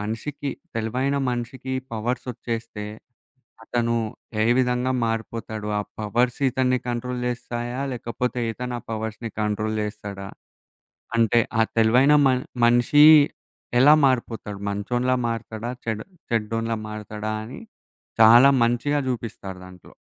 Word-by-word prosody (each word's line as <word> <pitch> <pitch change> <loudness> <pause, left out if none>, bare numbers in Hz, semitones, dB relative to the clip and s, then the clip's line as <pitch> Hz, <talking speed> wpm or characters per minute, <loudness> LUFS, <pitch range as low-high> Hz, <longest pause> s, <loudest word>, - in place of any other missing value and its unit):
మనిషికి 115 +7 -4 0.2
తెలివైన 125 +5 -1
మనిషికి 125 +2 -4 0.2
పవర్స్ 120 +3 -2
ఒచ్చేస్తే, 115 -2 -5 0.8
అతను 115 0 0 0.5
ఏ - - +2
విధంగా 125 0 +1
మారిపోతాడు? 110 -1 -4
ఆ - - 0 0.2
పవర్స్ 120 +4 0
ఇతన్ని 130 0 +1
కంట్రోల్ 125 +1 -3
జేస్తాయా 120 +1 -4
లేకపోతే, 125 +1 -3
ఇతను 125 +1 -5
ఆ - - -9
పవర్స్‌ని 110 +1 -4
కంట్రోల్ 105 +1 -1
జేస్తాడా? 105 -2 -6 0.9
అంటే, 115 0 +4 0.2
ఆ - - +7 0.2
తెలివైన 125 +6 +5
మన్ 130 -1 +2 0.2
మనిషి 120 +5 +5 0.8
ఎలా 145 +4 +8
మారిపోతాడు? 115 -5 -2
మంచోనిలా 120 +5 0
మారతాడా? 115 0 -4 0.2
చెడ్ 110 -1 -2 0.3
చెడ్డోనిలా 115 +1 -1
మారతాడా 105 0 -5
అని, 125 - -9 0.6
చాలా 120 +5 +8
మంచిగా 120 +5 +1
జూపిస్తారు 105 -6 -5
దాంట్లో. 90 -1 -15
115 Hz, 110 wpm, -24 LUFS, 110-125 Hz, 0.9 s, ఎలా